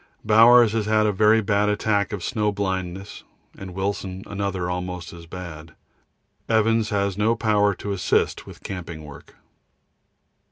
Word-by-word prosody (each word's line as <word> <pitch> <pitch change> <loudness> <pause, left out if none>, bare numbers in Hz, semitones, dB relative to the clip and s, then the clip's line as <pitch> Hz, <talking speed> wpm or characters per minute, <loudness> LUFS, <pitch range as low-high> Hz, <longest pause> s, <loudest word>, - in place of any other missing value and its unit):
Bowers 115 +1 +7
has 110 -1 -1
had 110 0 +3
a 105 - +2
very 110 +3 +4
bad 105 0 +1
attack 105 -1 0
of 100 -4 -5
snow 105 -1 0
blindness, 95 -1 -4 0.3
and 95 -2 -9
Wilson 95 -1 -3
another 100 -3 -3
almost 90 0 -5
as 85 -1 -12
bad. 80 -3 -9 0.7
Evans 110 0 +2
has 100 -2 -1
no 110 +2 +2
power 105 -3 +2
to 100 - -5
assist 100 -2 0
with - - -13
camping 85 -4 -7
work. 75 -2 -13
100 Hz, 145 wpm, -23 LUFS, 90-105 Hz, 0.7 s, Bowers